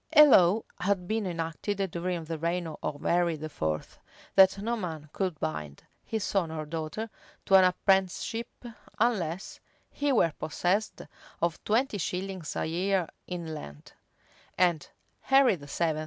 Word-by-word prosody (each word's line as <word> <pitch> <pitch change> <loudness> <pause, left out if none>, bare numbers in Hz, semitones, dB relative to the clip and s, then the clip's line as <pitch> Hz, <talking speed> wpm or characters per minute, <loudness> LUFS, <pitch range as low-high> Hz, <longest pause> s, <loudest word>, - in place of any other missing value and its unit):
A 300 - +11
law 205 -5 +5 0.2
had 190 -2 0
been 220 -1 -1
enacted 165 +4 -3
during 175 0 -2
the 160 0 -5
reign 170 +2 -1
of 150 -2 -5
Henry 170 -1 +2
IV.,[] 80 - -4 0.3
that 190 0 +6
no 225 +4 -1
man 160 -8 -6
could 185 -5 -2
bind 75 -2 -4 0.2
his 220 -3 -3
son 190 -6 0
or 155 -1 -4
daughter 160 +7 -4 0.4
to - - -1
an 190 -1 +9
apprenticeship, 190 +5 +1 0.5
unless 190 -7 -1 0.3
he 290 0 0
were 170 - +3
possessed 185 +7 -1 0.4
of 170 -1 -1
twenty 225 0 +1
shillings 185 -1 -4
a - - -1
year 180 +2 0 0.2
in 170 -3 -5
land; 75 - -10 0.6
and 175 -4 +2 0.3
Henry 270 -5 +4
VII. 155 +1 -2
180 Hz, 140 wpm, -29 LUFS, 160-200 Hz, 0.6 s, A